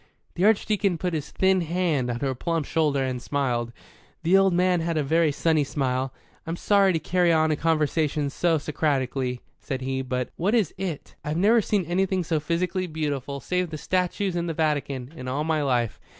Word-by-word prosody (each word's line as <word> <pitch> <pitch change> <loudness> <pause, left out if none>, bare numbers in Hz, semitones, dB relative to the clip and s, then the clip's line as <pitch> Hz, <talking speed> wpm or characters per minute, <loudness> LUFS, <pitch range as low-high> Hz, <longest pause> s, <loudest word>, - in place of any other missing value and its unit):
The 180 - +1
Archdeacon 205 -3 +2
put 180 +1 -2
his 150 -2 -3
thin 190 -1 +2
hand 165 -6 0
on 120 0 -3
her 135 -2 0
plump 165 +4 -2
shoulder, 145 -4 +1
and 130 -2 -3
smiled. 120 -5 -1 0.5
The 170 +3 +4
old 195 0 +5
man 180 0 +2
had 165 0 -1
a 150 - +1
very 160 +2 +2
sunny 155 +1 +2
smile. 130 -2 -1 0.4
"I'm 165 - -2
sorry 200 +1 +3
to - - +2
carry 175 +2 +2
on 160 -1 +3
a - - +2
conversation 150 -2 0
so 165 +2 +2
Socratically," 135 -4 -1 0.2
said 130 -1 -4
he. 130 0 -2
"But 125 -1 -2
what 200 +7 +1
is 210 -9 +1
'it'?" 180 -6 -5
"I've 150 +2 -2
never 220 +6 +4
seen 205 -3 0
anything 185 +2 0
so 160 -1 0
physically 180 +4 -1
beautiful, 145 -4 -3
save 180 +5 -1
the 155 - -5
statues 185 +3 -1
in 170 0 -1
the 165 - -3
Vatican, 145 -4 -1
in 130 -5 -7
all 135 +4 -1
my 155 -1 0
life. 120 -8 0
160 Hz, 195 wpm, -25 LUFS, 140-180 Hz, 0.5 s, old